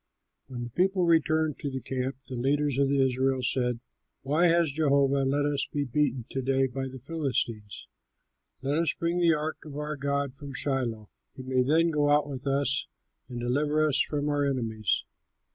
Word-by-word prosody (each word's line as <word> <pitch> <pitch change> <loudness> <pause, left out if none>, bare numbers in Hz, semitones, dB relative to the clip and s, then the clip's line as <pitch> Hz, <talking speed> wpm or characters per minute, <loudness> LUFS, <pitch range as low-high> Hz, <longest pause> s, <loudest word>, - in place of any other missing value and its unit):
When 125 -2 -6
the 120 - -7
people 185 - +2
returned 160 -2 +2
to 145 - -3
the 130 -1 -4
camp, 130 +1 -4
the 130 - -7
leaders 140 +2 0
of 140 -1 +3
Israel 130 -1 +1
said, 125 -1 0 0.4
"Why 155 +6 +3
has 170 -2 +3
Jehovah 140 -2 +2
let 145 +2 +1
us 145 -1 0
be 145 - -1
beaten 135 -2 0
to 135 - -2
day 135 +1 +2
by 135 +1 -4
the 130 0 -9
Philistines? 125 -7 -3 0.8
Let 145 +3 0
us 165 -2 +1
bring 170 +1 -1
the 170 -2 +4
ark 155 +1 -3
of 150 -3 -10
our 150 +1 -3
God 140 -1 -1
from 140 0 -9
Shiloh. 125 -6 -2 0.2
He 130 - -8
may 130 0 +1
then 160 +6 +3
go 145 -1 +2
out 145 0 +3
with 140 -1 -6
us 140 0 +1 0.4
and 120 -1 -5
deliver 145 +5 +1
us 140 -3 +3
from 145 -1 -1
our 145 -1 +1
enemies." 115 -7 0
140 Hz, 180 wpm, -28 LUFS, 130-150 Hz, 0.8 s, the